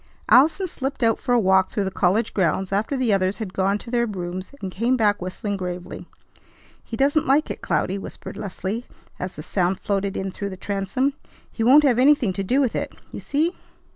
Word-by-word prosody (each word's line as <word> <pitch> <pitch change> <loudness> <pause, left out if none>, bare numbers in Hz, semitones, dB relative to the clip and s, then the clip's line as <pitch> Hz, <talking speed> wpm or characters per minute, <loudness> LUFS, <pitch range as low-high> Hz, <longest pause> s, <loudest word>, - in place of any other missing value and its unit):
Allison 320 +9 +5
slipped 270 -6 -4
out 225 -1 +3
for 250 - -3
a 245 - +5
walk 190 -2 +3
through 205 - -1
the 190 - -2
college 200 +6 +1
grounds 190 0 0
after 215 +8 0
the 245 -5 +2
others 190 0 +1
had 210 -5 -5
gone 195 +2 +1
to 230 - -10
their 235 -1 +1
rooms, 185 -2 -5
and 190 -5 -5
came 235 +7 +1
back 205 -4 +2
whistling 195 +3 -3
gravely. 180 0 -6 0.8
"He 225 - -6
doesn't 285 +4 +2
like 285 +3 +3
it, - - -7
Cloudy," 195 +2 0
whispered - - -8
Leslie 200 +4 -4 0.3
as 180 - -5
the 150 - -7
sound 185 +1 0
floated 200 -2 -1
in 190 0 -3
through 200 +2 -5
the 190 - -8
transom. 200 +8 -1 0.4
"He 225 - -3
won't 275 +6 +7
have 250 -4 +3
anything 260 -7 +4
to 195 - -2
do 250 +8 +1
with 260 -5 +1
it. - - -3 0.2
You - - -6
see!" 315 +5 0
205 Hz, 205 wpm, -23 LUFS, 190-255 Hz, 0.8 s, won't